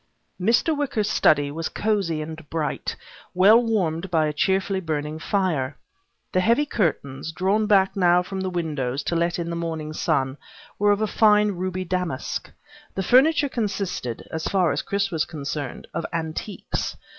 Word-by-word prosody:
Mr. 235 - +3
Wicker's 260 -8 -1
study 145 -7 +3
was 165 +2 -3
cosy 195 -8 0
and 160 -1 -9
bright, 160 -2 -2 0.4
well 205 +6 +7
warmed 190 -6 0
by 160 -3 +2
a 150 - -1
cheerfully 190 +4 +1
burning 155 -2 -3
fire. 160 -9 -1 0.5
The 185 - +2
heavy 235 +10 +3
curtains, 160 - -1
drawn 195 +6 +1
back 195 -2 +4
now 180 -2 +4
from 190 +1 -5
the 190 - -1
windows 150 -7 -2
to 170 - -1
let 170 +1 +1
in 170 -1 -3
the - - -3
morning 160 -2 -4
sun, 140 -4 0 0.4
were 205 0 +3
of 205 +1 +1
a - - +3
fine 210 -1 +4
ruby 185 0 -3
damask. 180 -6 -3 0.5
The 190 - -1
furniture 285 - +5
consisted, 195 - -3
as 160 0 -3
far 185 -4 +2
as - - -1
Chris 200 0 -1
was 160 -3 +1
concerned, 145 -3 -5
of - - -2
antiques. 165 +4 -4
180 Hz, 160 wpm, -24 LUFS, 155-200 Hz, 0.5 s, well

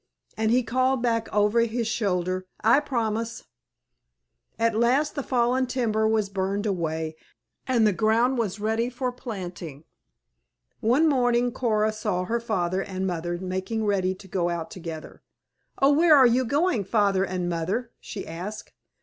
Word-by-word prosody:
And 220 0 0
he 250 +2 +3
called 255 +2 +1
back 230 -2 0
over 210 +2 +3
his 230 0 0
shoulder, 185 -4 -1 0.2
"I 235 +5 +6
promise!" 230 -5 -2 1.1
At 230 0 +2
last 250 +7 +2
the 285 - -3
fallen 255 0 +1
timber 220 -4 0
was 220 -2 +1
burned 195 +1 -2
away, 160 -5 -2 0.5
and 240 -4 +3
the 210 - +3
ground 230 +7 +2
was 205 -3 -2
ready 220 +3 0
for 250 0 -3
planting. 180 - -7 1.0
One 255 +9 +3
morning 245 -3 +2
Coora 215 -3 0
saw 185 -4 -2
her 230 +6 -1
father 190 -5 -1
and 190 -1 -4
mother 175 -1 -2
making 190 +4 -3
ready 190 -2 +1
to 190 +1 -14
go 175 -1 -1
out 170 -2 -4
together. 165 -3 -8 0.6
"Oh, 275 +1 +5
where 320 +1 +6
are 265 - +7
you 250 +2 +3
going, 285 - +1
Father 195 -1 +2
and 185 -2 -2
Mother?" 185 +8 -2
she 200 - -7
asked. 185 +6 -7
220 Hz, 150 wpm, -25 LUFS, 185-240 Hz, 1.1 s, are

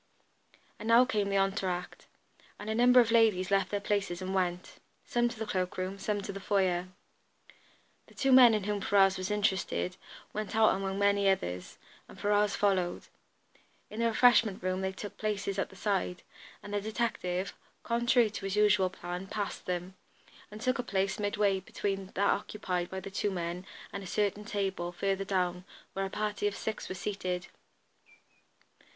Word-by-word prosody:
And 220 - -6
now 235 +2 +7
came 210 -5 0
the 200 - +1
entre 195 0 +1
acte, 180 0 -5 0.5
and 210 +2 -5
a - - +1
number 245 +2 +6
of 230 -2 +4
ladies 215 -5 +3
left 195 -2 +2
their 205 - -1
places 200 -4 -1
and 190 0 -4
went, 180 -2 -2 0.3
some 240 0 +1
to 235 - -9
the 220 - -3
cloak 185 -3 -2
room, 185 +2 -3
some 205 +1 -1
to 200 - -5
the 195 - -6
foyer. 185 -3 +1 1.2
The - - -19
two 270 - +1
men 250 -3 +8
in 210 - -1
whom 205 0 -2
Ferrars 195 -1 +4
was 185 +1 -3
interested 190 -3 0 0.4
went 215 0 -4
out 220 -1 +5
among 195 0 -2
many 200 0 +3
others, 90 - -2 0.3
and - - -14
Ferrars 205 0 +2
followed. 190 -4 0 0.8
In 215 - -6
the 230 - +3
refreshment 225 -4 +4
room 185 0 -1
they 190 0 -1
took 205 +2 -8
places 205 -2 -2
at - - -1
the - - -15
side, 190 -3 -1 0.4
and 205 - -8
the 205 - 0
detective, 200 -4 -2 0.3
contrary 235 -1 +3
to 200 - -6
his 195 0 -2
usual 210 -3 +4
plan, 180 +1 -6
passed 205 0 -4
them, 180 +1 -3 0.6
and 210 - -9
took 255 +3 0
a - - 0
place 195 -3 -1
midway 205 -1 +1
between 195 +1 -3
that 200 +1 +3
occupied 180 -4 -2
by 190 - -4
the 195 +1 -8
two 200 +1 0
men 180 0 -4 0.3
and 200 - -4
a - - -8
certain 210 +1 -1
table, 195 -4 -2
further 195 +2 -1
down, 180 -2 0 0.3
where 195 0 -1
a - - -4
party 210 0 -1
of 205 - -2
six 220 - -4
were 185 - -4
seated. 185 -2 -3
195 Hz, 180 wpm, -31 LUFS, 185-210 Hz, 1.2 s, men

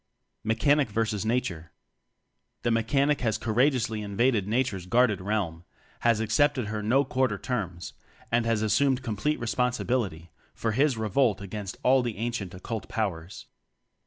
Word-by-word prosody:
Mechanic 130 +5 +2
vs. 110 -1 -1
Nature 90 -9 -2 0.9
The 120 - +1
Mechanic 135 +6 +2
has 110 -3 +1
courageously 120 -1 +1
in 100 -1 -6
vaded 115 -5 +2
Nature's 110 -5 -1
guarded 115 -2 +3
realm; 95 -5 -2 0.4
has 115 -2 +3
ac 110 -1 -2
cepted 140 -7 +2
her 110 -1 -3
"no 130 +7 +2
quarter" 130 -5 0
terms; 95 -7 -4 0.4
and 120 0 +3
has 115 -2 +1
assumed 130 +4 +2
complete 115 +6 -1
responsibility 120 -8 -1 0.2
for 115 - -1
his 135 +2 +2
revolt 110 0 +1
against 100 0 -6
all 130 +1 +5
the 120 -4 -3
ancient 110 -5 -3
Occult 110 +4 -6
Powers. 95 -6 -3
110 Hz, 140 wpm, -27 LUFS, 105-125 Hz, 0.9 s, all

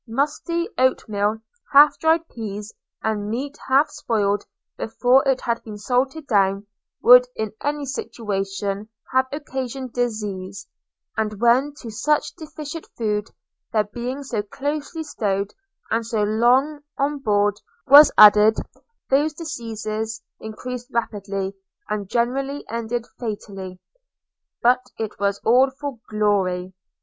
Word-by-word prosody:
Musty 300 +8 -1
oatmeal, 215 -5 +1 0.4
half 290 +1 +7
dried 325 +1 +2
pease, 210 -4 -7 0.3
and 210 -2 -1
meat 275 +6 -3
half 270 +3 +4
spoiled 205 -2 0 0.3
before 245 +4 +3
it 265 -1 +2
had 235 -1 -1
been 215 -2 -9
salted 265 +7 -1
down, 195 -4 +2 0.4
would 250 +1 +8
in 220 -2 -3
any 290 0 -1
situation 200 -5 -3 0.2
have 260 0 +3
occasioned 265 -3 -5
diseases; 200 -5 -3 0.5
and 215 -2 -2
when 255 +5 +3
to 235 -5 -9
such 300 +7 0
defective 310 0 -8
food, 210 -2 -1 0.4
their 215 -1 +3
being 245 +6 -5
so 235 -6 -2
closely 290 +8 -4
stowed 200 -8 -2 0.4
and 230 +1 +1
so 220 -2 -1
long 245 +8 +3 0.2
on 285 +1 0
board 205 -4 +1 0.2
was 285 +2 +9
added, 210 +1 +8 0.5
those 295 +3 +3
diseases 225 -7 -5 0.2
increased 245 +3 -6
rapidly, 200 -4 -2 0.4
and 205 -2 -3
generally 270 +5 -1
ended 230 0 -2
fatally. 195 -5 -6 0.8
But 250 +1 +5 0.2
it 220 -2 -5
was 200 0 +1
all 255 +4 +5
for 270 -2 -7
glory. 190 -4 0
230 Hz, 120 wpm, -22 LUFS, 210-270 Hz, 0.8 s, was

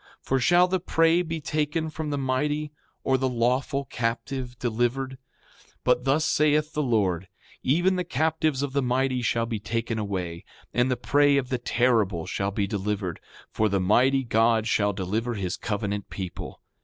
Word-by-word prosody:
6:16 - - -54
For 135 - +1
shall 175 +8 +5
the 185 0 0
prey 165 0 +3
be 165 -2 -3
taken 150 +2 -1
from 155 0 -4
the 145 - -1
mighty, 145 +3 -1 0.3
or 130 -1 +2
the 130 0 +1
lawful 125 +4 0
captive 125 +1 -3
delivered? 120 +3 -1 0.5
6:17 - - -28
But 125 0 +2
thus 145 +4 +2
saith 150 0 +2
the 150 - 0
Lord: 100 - +1 0.3
Even 175 +7 +2
the 180 - 0
captives 155 -2 0
of 140 -2 -3
the 140 - +2
mighty 130 0 +1
shall 115 0 +1
be 115 -2 -3
taken 115 +1 -2
away, 90 -5 -3 0.3
and 125 +1 +2
the 125 - 0
prey 145 +3 +3
of 130 -2 -1
the 130 -2 -1
terrible 115 -9 +1
shall 100 0 -2
be 100 0 -1
delivered; 100 -3 -3 0.3
for 110 -1 +1
the 100 0 +1
Mighty 130 +8 +3
God 115 -1 +2
shall 105 -2 +2
deliver 105 +5 -2
his 95 -3 -2
covenant 105 -2 -3
people. 95 -3 -7
125 Hz, 175 wpm, -26 LUFS, 110-145 Hz, 0.5 s, shall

